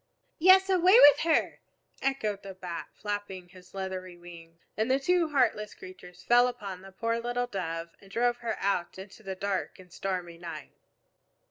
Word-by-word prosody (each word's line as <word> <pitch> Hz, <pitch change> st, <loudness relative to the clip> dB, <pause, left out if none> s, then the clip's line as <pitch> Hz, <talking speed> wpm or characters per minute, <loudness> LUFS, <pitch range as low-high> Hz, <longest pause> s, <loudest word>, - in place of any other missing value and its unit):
"Yes, 375 Hz, +3 st, +7 dB
away 375 Hz, +3 st, +5 dB
with 290 Hz, -5 st, +8 dB
her!" 325 Hz, 0 st, +1 dB, 0.4 s
echoed 220 Hz, -7 st, -1 dB
the 195 Hz, -1 st, -9 dB
Bat, 175 Hz, -2 st, -6 dB
flapping 205 Hz, -4 st, -5 dB
his 185 Hz, 0 st, -17 dB
leathery 185 Hz, -2 st, -5 dB
wings. 170 Hz, -1 st, -13 dB, 0.2 s
And 220 Hz, +3 st, -1 dB
the 265 Hz, +1 st, +3 dB
two 345 Hz, +3 st, +2 dB
heartless 245 Hz, -7 st, +1 dB
creatures 365 Hz, -, -13 dB
fell 245 Hz, +1 st, +5 dB
upon 200 Hz, -7 st, -6 dB
the 195 Hz, 0 st, -12 dB
poor 230 Hz, +4 st, -2 dB
little 245 Hz, +1 st, -2 dB
Dove 170 Hz, -6 st, -5 dB
and 195 Hz, -, -17 dB
drove 240 Hz, +3 st, +1 dB
her 230 Hz, -2 st, -4 dB
out 190 Hz, -3 st, -1 dB
into 190 Hz, +2 st, -11 dB
the 195 Hz, -2 st, -6 dB
dark 195 Hz, 0 st, -3 dB
and 185 Hz, -2 st, -16 dB
stormy 180 Hz, -3 st, -4 dB
night. 170 Hz, -1 st, -8 dB
200 Hz, 165 wpm, -29 LUFS, 185-245 Hz, 0.4 s, with